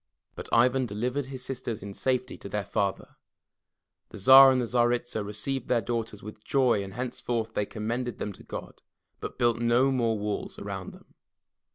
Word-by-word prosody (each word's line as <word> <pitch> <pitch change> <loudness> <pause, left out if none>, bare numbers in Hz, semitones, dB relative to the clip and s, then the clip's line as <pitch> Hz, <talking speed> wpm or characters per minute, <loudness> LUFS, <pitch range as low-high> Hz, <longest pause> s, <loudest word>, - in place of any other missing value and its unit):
But - - -8
Ivan 125 +2 +3
delivered 125 +6 -2
his 130 -2 -7
sisters 120 -5 -4
in 100 -1 -7
safety 130 +3 -1
to 100 - -8
their 105 +1 -2
father. 100 0 -2 0.9
The - - -10
Tsar 135 +6 +9
and 130 - +2
Tsaritsa 120 -1 0
received 115 +6 -4
their 125 - +3
daughters 115 -1 -4
with 105 0 -10
joy 125 -7 +2
and 95 0 -9
henceforth 120 -2 -3
they 105 - -1
commended 115 +2 -3
them 105 - -4
to - - -14
God, - - -8 0.4
but - - -7
built 120 -2 +2
no 120 +3 +3
more 115 -4 +1
walls 105 0 -4
around - - -6
them. - - -18
120 Hz, 170 wpm, -28 LUFS, 105-125 Hz, 0.9 s, Tsar